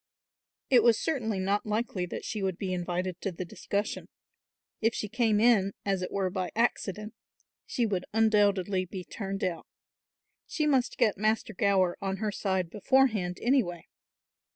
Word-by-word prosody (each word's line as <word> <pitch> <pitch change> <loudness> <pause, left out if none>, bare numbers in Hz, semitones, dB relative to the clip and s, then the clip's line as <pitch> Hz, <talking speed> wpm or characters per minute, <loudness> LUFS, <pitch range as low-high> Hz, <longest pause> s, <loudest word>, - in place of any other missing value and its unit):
It 250 -3 +7
was 230 -1 +5
certainly 240 -10 -1
not 195 +2 0
likely 210 -4 -2
that - - -6
she 210 - -3
would 190 -2 -1
be 190 -2 -3
invited 180 0 -3
to 195 - -2
the 180 +1 -6
discussion. 200 +4 -3 0.7
If 225 +1 +2
she 210 - -2
came 220 -1 +2
in, 210 -4 +4
as 195 -2 0
it 180 - -3
were 190 -2 -1
by 185 -1 -2
accident, 215 -2 -1 0.5
she 240 - 0
would 190 -4 -2
undoubtedly 205 -4 +3
be 185 0 -7
turned 195 0 -5
out. 175 -3 -2 0.8
She 310 - -1
must 270 -4 +1
get 210 -3 +2
Master 215 +1 0
Gower 195 -4 +2
on 195 0 -2
her 215 0 -1
side 190 -4 -1
beforehand 210 -5 +2
anyway. 230 -10 +1
200 Hz, 155 wpm, -29 LUFS, 185-220 Hz, 0.8 s, It